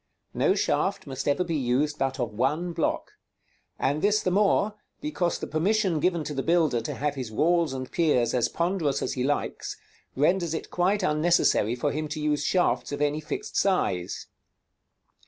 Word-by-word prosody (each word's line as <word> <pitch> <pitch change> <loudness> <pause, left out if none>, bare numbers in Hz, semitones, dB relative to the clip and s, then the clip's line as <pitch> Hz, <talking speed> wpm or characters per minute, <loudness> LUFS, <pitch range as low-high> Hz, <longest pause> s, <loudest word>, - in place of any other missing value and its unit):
No - - +2
shaft - - 0
must 135 0 -5
ever 145 +5 +2
be 170 -2 -3
used 145 +2 0
but 135 0 -1
of 120 -4 -2
one 150 +10 0
block; 165 - -1 0.7
and 145 +3 0
this 210 +1 +3
the 185 - +1
more, 205 +1 +3 0.3
because 205 - -1
the - - -5
permission 185 +1 +1
given 170 0 +1
to 150 - -5
the 135 - -1
builder 160 -7 +2
to 115 - -4
have 145 0 -1
his 130 -5 -5
walls 165 +5 +2
and 130 -1 -5
piers 125 -8 +2
as 125 -2 +2
ponderous 170 -4 0
as - - -2
he 125 - -2
likes, 145 +2 -2 0.4
renders 165 +3 +2
it - - -6
quite 190 +3 +1
unnecessary 150 - +2
for 120 - -1
him 155 +1 -3
to 155 +1 -5
use 150 -1 0
shafts 130 -8 +1
of 145 - -3
any 150 +1 0
fixed 150 - -5
size. 95 - 0
150 Hz, 175 wpm, -26 LUFS, 135-175 Hz, 0.7 s, this